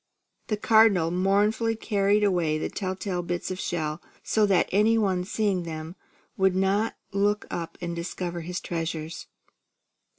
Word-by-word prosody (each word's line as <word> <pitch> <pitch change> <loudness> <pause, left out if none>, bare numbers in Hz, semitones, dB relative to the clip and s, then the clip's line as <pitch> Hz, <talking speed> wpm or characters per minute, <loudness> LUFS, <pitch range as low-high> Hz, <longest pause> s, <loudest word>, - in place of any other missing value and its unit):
The 215 - -1
Cardinal 210 -6 +4
mournfully 205 +5 +2
carried 205 -1 +1
away 175 -6 +2
the - - -3
tell 190 -2 -3
tale 185 -2 -3
bits 175 +1 -3
of 185 - -4
shell, 155 -2 -2 0.2
so 215 -1 +2
that 190 -3 +3
any 215 +4 +4
one 190 -4 +1
seeing 200 -1 0
them 160 0 -6 0.4
would 190 -1 +3
not 195 +4 +1 0.2
look 205 +2 +1
up 165 -1 -5
and 170 -1 -3
discover 175 0 -4
his 175 +2 -4
treasures. 165 -1 -4
185 Hz, 145 wpm, -26 LUFS, 170-205 Hz, 0.4 s, Cardinal